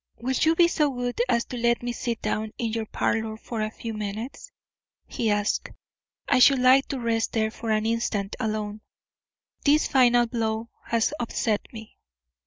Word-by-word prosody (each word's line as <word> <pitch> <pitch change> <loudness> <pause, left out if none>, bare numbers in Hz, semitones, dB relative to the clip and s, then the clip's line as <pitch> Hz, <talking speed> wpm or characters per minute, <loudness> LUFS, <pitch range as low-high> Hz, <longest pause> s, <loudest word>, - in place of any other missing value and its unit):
"Will 255 +3 -2
you 320 +5 +3
be 340 0 +6
so 305 -3 +1
good 245 -2 -2
as 235 -1 +2
to 250 - -6
let 235 0 +1
me 240 - -2
sit 235 -2 -4
down 215 0 -2
in 230 -2 -2
your 225 -1 -2
parlour 220 0 -1
for 225 0 -5
a 215 - -1
few 225 +1 -7
minutes?" 215 - -6 0.5
he 230 - -2
asked. 205 0 0 0.6
"I - - +3
should 270 +2 +7
like 255 +2 +5
to 270 - -3
rest 230 -1 0
there 220 -1 +1
for 230 0 -6
an 215 0 +1
instant 220 -3 -1
alone. 215 -1 -3 0.8
This 300 +1 +4
final 245 -2 +4
blow 225 -1 -2 0.2
has 230 +4 +1
upset 225 -2 -1
me." 220 -2 -11
230 Hz, 175 wpm, -25 LUFS, 220-245 Hz, 0.8 s, should